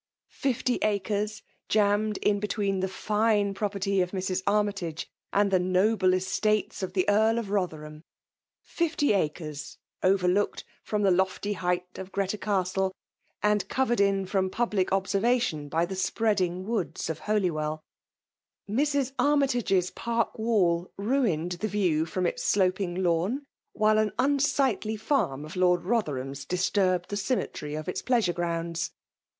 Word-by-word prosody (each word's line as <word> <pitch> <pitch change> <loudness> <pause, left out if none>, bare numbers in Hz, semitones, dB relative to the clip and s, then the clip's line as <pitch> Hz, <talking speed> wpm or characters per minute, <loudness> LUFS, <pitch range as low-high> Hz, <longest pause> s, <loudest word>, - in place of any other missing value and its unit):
Fifty 255 -2 0
acres» 210 +1 -1 0.3
jammed 210 0 +2
in 205 -1 +2
between 200 -2 -1
the 190 - 0
fine 210 +1 +1
property 200 -1 0
of 180 - 0
Mra. 185 -1 -2
Armytage 200 -6 0 0.2
and 200 0 +2
the 185 - +4
noble 185 +1 +3
estates 210 +3 0
of 190 - -4
the 185 -2 +1
Ead 220 +2 +4
of 230 -4 -3
Botherham. 155 -6 -3 0.6
Fifty 310 -6 0
acres, 155 -5 -3 0.2
overlooked 190 +1 +2 0.2
from 210 -1 -1
the 195 - +4
lofty 190 +3 +1
height 180 -1 -2
of 190 0 -7
Greta 200 +1 -1
Castle, 190 -2 0 0.5
and 210 -2 +2
covered 240 -4 +1
in 195 -1 +2
&om 190 -1 0
public 210 -3 0
observation 195 -5 +1
by 165 +3 +1
the 190 +2 -5
spreading 185 -2 0
woods 195 -9 -2
of 160 - -3
Holywell 155 -7 -1 0.8
Mrs. 275 +4 +1
Armytage's 245 -11 +2
park 230 -1 -1
wall 185 -6 +1
ruined 200 - 0
the 215 - 0
view 180 -6 +1
from 180 +2 -2
its - - -1
sloping 185 -2 +1
lawn» 180 - +1 0.3
while 215 0 +3
an 215 -1 +1
unsightly 265 -5 +1
farm 205 - 0
of 155 - -9
Lord 180 -1 +3
Botherbam's 140 - -2
disturbed 180 +2 +1
the 205 - -1
symmetry 195 - -2
of 155 0 -5
its 180 - -2
pleasure 230 -8 +2
grounds. 170 0 -2
195 Hz, 135 wpm, -27 LUFS, 180-215 Hz, 0.8 s, the